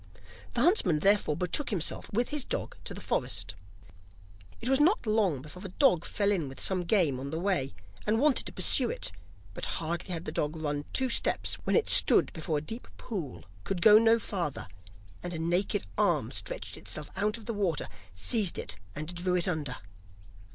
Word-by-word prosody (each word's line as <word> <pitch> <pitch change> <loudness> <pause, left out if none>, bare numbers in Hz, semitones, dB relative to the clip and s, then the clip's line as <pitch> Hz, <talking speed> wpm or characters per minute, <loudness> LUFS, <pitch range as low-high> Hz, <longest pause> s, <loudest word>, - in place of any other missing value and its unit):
The 235 - +1
huntsman 255 - +5
therefore 200 -6 +2
betook 180 - +1
himself 185 -8 -2
with 240 +4 0
his 295 -3 -1
dog - - -4
to - - -3
the - - -7
forest. - - -1 1.1
It 235 - -6
was 265 +1 +3
not 350 - +3
long 205 - +1
before 155 +4 -11
the 195 - -7
dog 185 - +2
fell 205 -1 0
in 170 -9 -1
with 135 - -11
some 185 -2 +1
game 170 - +2
on 135 +1 -5
the 160 - -4
way, 175 -8 -1 0.3
and 220 +2 +2
wanted 290 0 +2
to - - -4
pursue 250 -3 +3
it; - - -1 0.4
but - - -4
hardly 170 +3 -4
had 165 -2 -4
the - - -4
dog 150 +1 -2
run 145 -2 -3
two 260 -1 +1
steps - - +1
when - - +1
it 460 - +2
stood - - +7
before 160 -1 -2
a - - -2
deep 225 - -6
pool, 180 - -6 0.2
could 185 - -3
go 215 0 +8
no 225 0 +4
farther, 180 - -4 0.5
and 175 -1 -5
a - - -3
naked 175 - -1
arm - - +1
stretched - - -5
itself 150 -1 -7
out 210 +2 0
of 225 - -13
the 230 - -3
water, 190 -7 -1 0.2
seized 180 - +1
it, - - -3 0.2
and 155 +4 -5
drew 180 +1 -1
it 175 0 +1
under. 150 -7 -2
180 Hz, 195 wpm, -29 LUFS, 155-225 Hz, 1.1 s, go